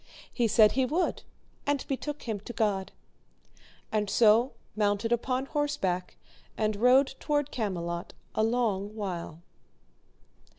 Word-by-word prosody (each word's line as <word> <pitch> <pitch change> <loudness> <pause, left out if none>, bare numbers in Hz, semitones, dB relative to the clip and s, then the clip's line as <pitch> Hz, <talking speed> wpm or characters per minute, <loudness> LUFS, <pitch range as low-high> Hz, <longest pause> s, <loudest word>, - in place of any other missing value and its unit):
He 240 -2 +2
said 215 0 +6
he 265 - +1
would, 315 +8 0 0.5
and 285 -2 0
betook 290 +2 -4
him 220 -4 -3
to 225 +4 -9
God. 205 -4 0 1.0
And 210 -2 0
so 225 +4 +4 0.2
mounted 210 +1 +1
upon 255 +2 0
horseback 190 -12 -2 0.4
and 215 -1 +1
rode 255 +4 +5
towards 290 -2 0
Camelot 170 -6 -3 0.2
a - - 0
long 220 -3 0
while. 175 -5 -5
220 Hz, 120 wpm, -29 LUFS, 200-260 Hz, 1.0 s, said